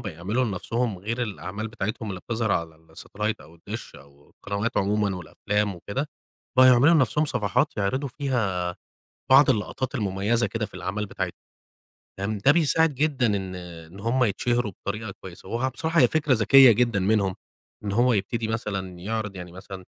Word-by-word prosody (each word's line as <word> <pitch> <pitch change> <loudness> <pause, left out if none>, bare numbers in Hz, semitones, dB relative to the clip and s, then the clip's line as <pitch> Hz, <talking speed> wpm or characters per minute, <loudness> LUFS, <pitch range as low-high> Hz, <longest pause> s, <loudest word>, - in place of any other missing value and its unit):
بيعملوا 100 +10 -1
لنَفْسهم 115 0 -2
غير 115 +6 -3
الأعمال 105 0 -5
بتاعتهم 110 +1 -4
اللي 95 -2 -5
بتظهر 110 -2 -1
على 80 -2 -2 0.2
الsatellite 105 +5 -3
أو 80 +2 -15
الدِش 85 - -8
أو 70 +1 -19
القنوات 100 +3 -4
عمومًا 100 -1 +1
والأفلام 105 +3 -2
وكده 115 - -4 0.5
بقوا 130 0 +8
يعملوا 130 +7 +6
لنَفْسهم 150 +1 +3
صفحات 105 -9 0
يعرضوا 130 +8 -1
فيها 105 -11 -2 0.5
بعض 135 +1 +7
اللقطات 130 +3 -2
المميزة 105 +1 +1
كده 110 -2 -3
في - - -20
الأعمال 105 +3 -3
بتاعتهم. - - -5 0.8
تمام، 100 +2 -2
ده 135 +8 +5
بيساعد 160 -1 +3
جدًا 140 -2 +1
إن 95 -4 -1
إن 85 0 -10
هُم 120 +4 +1
يتشهروا 120 +1 0
بطريقة 100 +3 -5
كويسة 95 0 -11
وهو 120 +3 0
بصراحة 160 +5 0
هي 125 - +7
فكرة 150 0 +1
ذكية 130 +2 +7
جدًا 115 -2 +2
منهم 100 -1 +1 0.5
إن 100 - -3
هو 120 +4 +3
يبتدي 110 +2 -1
مثلًا 95 -5 -4
يعرض 105 +1 -3
يعني 90 -1 -8
مثلًا 95 0 -10
105 Hz, 160 wpm, -25 LUFS, 95-125 Hz, 0.8 s, بقوا